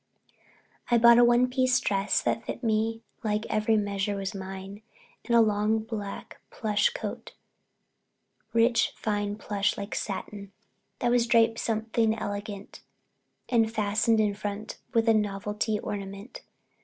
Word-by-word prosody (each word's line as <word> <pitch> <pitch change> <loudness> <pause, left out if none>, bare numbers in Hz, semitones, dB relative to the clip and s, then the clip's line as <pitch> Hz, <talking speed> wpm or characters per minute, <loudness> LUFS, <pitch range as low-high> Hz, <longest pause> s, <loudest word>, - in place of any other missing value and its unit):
I 240 - +5
bought 235 +1 +7
a - - +7
one 240 +1 +4
piece 255 0 +1
silk - - -4
dress 195 0 +1
that 225 - 0
fitted - - -6
me 225 0 0 0.2
like 215 0 -1
every 215 +1 +2
measure 200 -1 -1
was 195 +1 -4
mine 195 +1 -7 0.4
and 235 - +1
a 230 - +7
long 210 0 +2
black 215 -2 -6
plush 210 -3 +1
coat, - - -6 1.2
rich 230 +1 +3
fine 205 -1 -2
plush 205 -1 -1
like 200 +1 -5
satin, 200 -1 -5 0.4
that 240 - 0
was 240 -1 +3
draped 230 -1 +3
something 220 0 0
elegant 205 -1 -6 0.7
and 225 -3 +2
fastened 215 +1 +1
in 210 -1 +2
front 205 +1 -6
with 230 -2 +1
a 225 - +6
novelty 210 +1 -1
ornament. 200 +3 -7
215 Hz, 140 wpm, -27 LUFS, 205-230 Hz, 1.2 s, bought